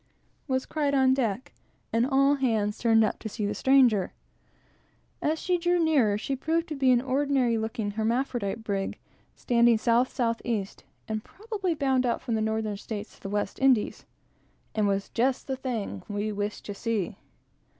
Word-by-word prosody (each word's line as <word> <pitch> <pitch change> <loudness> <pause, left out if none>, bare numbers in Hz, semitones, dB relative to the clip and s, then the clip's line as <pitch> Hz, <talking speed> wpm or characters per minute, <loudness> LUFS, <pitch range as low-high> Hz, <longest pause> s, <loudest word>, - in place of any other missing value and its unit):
was 260 -1 0
cried 290 -2 0
on 260 -1 +4
deck; 235 -3 -2 0.4
and 230 +2 +3
all 275 +1 +4
hands 220 -7 0
turned 225 -1 +4
up 215 - -1
to 220 - -5
see 210 0 -3
the 205 - -1
stranger. 255 -7 +3 1.1
As 310 +2 +1
she 360 +1 0
drew 350 +1 +2
nearer, 285 -11 +3
she 270 +6 -2
proved 325 +5 -1
to 305 - -3
be 270 -2 +2
an 245 - +5
ordinary 265 -2 +1
looking 220 -1 -2
hermaphrodite 225 -1 -1
brig, 200 -2 -2 0.4
standing 235 -1 +3
south 235 +3 +2
south 230 -3 -1
east; 210 -5 -3 0.2
and 215 -1 -3
probably 400 -5 -3
bound 265 -3 +1
out, 235 - 0
from 235 - -4
the 220 - +1
Northern 220 -1 -1
States, 210 +1 -7
to - - -27
the 195 - -6
West 205 -1 -2
Indies; 260 -5 +2 0.7
and 215 -2 +1
was 195 0 0
just 255 +2 0
the 265 - -2
thing 230 - -4
we 205 +1 -2
wished 205 0 -4
to 205 - -5
see. 210 -2 -2
235 Hz, 170 wpm, -27 LUFS, 215-270 Hz, 1.1 s, an